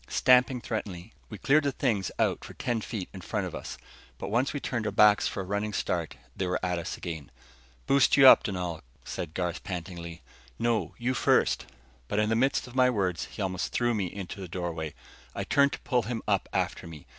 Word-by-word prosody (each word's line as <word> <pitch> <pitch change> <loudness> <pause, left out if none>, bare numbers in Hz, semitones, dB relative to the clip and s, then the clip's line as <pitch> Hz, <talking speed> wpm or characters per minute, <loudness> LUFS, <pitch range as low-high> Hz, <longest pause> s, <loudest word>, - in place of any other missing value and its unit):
Stamping 125 0 +4
threateningly, 105 -3 -5 0.2
we 105 - -7
cleared 145 +7 +3
the 140 - +1
things 110 -8 0
out - - +1
for - - -10
ten 120 -2 -1
feet 105 -4 -5
in 95 - -8
front - - -2
of - - -6
us. - - -6 0.4
But - - -5
once 125 +5 +2
we 145 - -3
turned 120 -5 -2
our - - -1
backs 105 -1 +5
for 100 - -3
a - - -4
running 100 +3 -2
start 85 -6 -2 0.2
they 95 - -2
were 90 - 0
at 90 -1 0
us 85 - -5
again. 80 -4 -6 0.6
"Boost 140 0 +4
you 135 -1 +9
up, - - +10
Dunal," 90 -5 -3 0.2
said 80 -2 -5
Garth 90 -2 -2
pantingly. 85 -3 -6 0.3
"No, 115 -6 0
you 125 +2 0
first." - - +2 0.4
But 100 - -2
in 105 0 +2
the 110 - +2
midst 135 +4 +2
of 125 - -12
my 130 -1 +4
words, 95 -7 -1
he 105 - -6
almost 95 -1 -2
threw 120 0 +1
me 100 -4 -1
into 100 +2 -7
the 95 - -6
doorway. 85 -3 -4 0.4
I - - -2
turned 140 0 +3
to - - -5
pull 125 -3 +1
him 115 +1 -4
up 100 -3 +1
after - - -2
me. 80 -3 -11
100 Hz, 215 wpm, -28 LUFS, 90-120 Hz, 0.6 s, up